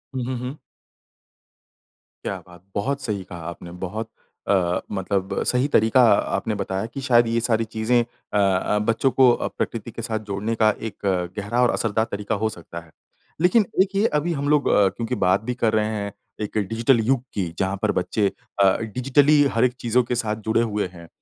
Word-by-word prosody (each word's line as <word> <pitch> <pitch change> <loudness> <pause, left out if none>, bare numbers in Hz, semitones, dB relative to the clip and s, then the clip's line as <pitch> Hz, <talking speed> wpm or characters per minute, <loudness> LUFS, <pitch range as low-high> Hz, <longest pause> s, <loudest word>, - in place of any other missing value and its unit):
हुँ, 130 - -1
हुँ, 130 0 -3
हुँ। 125 +4 -6 1.7
क्या - - -2
बात! 90 -1 -15
बहुत 135 +7 -1
सही 105 -6 -3
कहा 90 -1 -9
आपने। 85 0 -9 0.2
बहुत 110 +4 -5 0.4
अ, 90 -3 +2
मतलब 95 0 -2
सही 125 +2 +2
तरीका 115 -2 +4 0.3
आपने 105 +3 -2
बताया 95 0 -2
कि 115 +4 -7
शायद 120 -2 +5
ये 115 +1 +1
सारी 115 -1 +1
चीज़ें 110 +2 +1
अ 115 -3 -7 0.4
अ, - - +2
बच्चों 115 +5 +1
को 130 0 +6
अ, - - -1
प्रकृति 115 0 -3
के 115 - -7
साथ 110 -1 -2
जोड़ने 105 +3 -2
का 110 -1 +4 0.2
एक 100 - -21 0.4
गहरा 105 +4 0
और 125 - +4
असरदार 110 0 0
तरीका 105 +1 -2
हो 110 - +2
सकता 85 -4 -9
है। 80 - -21 0.5
लेकिन 190 +5 +4 0.2
एक 195 +1 0
ये 200 +2 +3
अभी 170 +3 -1
हम 145 -1 -2
लोग 150 -1 +3
अ, 100 - +5
क्योंकि 115 +6 -3
बात 95 +2 +3
भी - - +1
कर 115 -3 +1
रहे 110 -1 +2
हैं, 100 -1 -3 0.3
एक 105 +1 -3
डिजिटल 115 +5 +2
युग 120 +3 +2
की 95 -4 -1
जहाँ 95 +1 0
पर - - +2
बच्चे 105 -2 0 0.4
अ, 95 -1 +5
डिजिटली 135 +6 +3
हर 115 - +2
एक 125 - +1
चीज़ों 120 +2 +2
के 120 - -2
साथ 110 -2 -1
जुड़े 115 - +3
हुए 105 -4 -1
हैं 85 -1 -12
110 Hz, 195 wpm, -23 LUFS, 100-125 Hz, 1.7 s, को